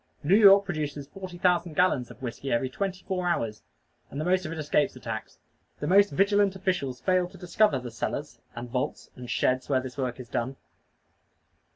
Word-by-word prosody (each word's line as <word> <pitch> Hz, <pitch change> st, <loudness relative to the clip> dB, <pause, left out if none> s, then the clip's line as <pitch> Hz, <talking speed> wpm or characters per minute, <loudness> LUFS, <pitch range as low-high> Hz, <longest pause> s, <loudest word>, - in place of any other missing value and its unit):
New 155 Hz, +6 st, +2 dB
York 200 Hz, -2 st, +7 dB
produces 150 Hz, -5 st, -3 dB
forty 185 Hz, +3 st, -9 dB
thousand 175 Hz, -2 st, +1 dB
gallons 145 Hz, -9 st, +2 dB
of -, -, -13 dB
whiskey 130 Hz, +2 st, -4 dB
every 130 Hz, +2 st, 0 dB
twenty 190 Hz, +3 st, -3 dB
four 180 Hz, -2 st, -2 dB
hours; 110 Hz, -11 st, -1 dB, 0.5 s
and 140 Hz, -, -6 dB
the 155 Hz, -, -2 dB
most 185 Hz, -1 st, +1 dB
of -, -, -6 dB
it 165 Hz, -, -5 dB
escapes 150 Hz, -2 st, +1 dB
the -, -, -10 dB
tax. 110 Hz, -3 st, -6 dB, 0.4 s
The -, -, -3 dB
most 200 Hz, +5 st, +5 dB
vigilant 200 Hz, 0 st, +2 dB
officials 180 Hz, -10 st, -2 dB
fail 185 Hz, -1 st, +1 dB
to 190 Hz, -, -14 dB
discover 180 Hz, -1 st, +2 dB
the 125 Hz, -2 st, -6 dB
cellars, 115 Hz, -, -4 dB, 0.2 s
and 120 Hz, +1 st, -6 dB
vaults, 125 Hz, +1 st, -3 dB
and 125 Hz, -1 st, -9 dB
sheds 130 Hz, +1 st, 0 dB
where 135 Hz, -2 st, +3 dB
this 130 Hz, +1 st, -8 dB
work 130 Hz, -1 st, -2 dB
is 125 Hz, -, -8 dB
done. 130 Hz, +3 st, -2 dB
155 Hz, 195 wpm, -27 LUFS, 130-185 Hz, 0.5 s, York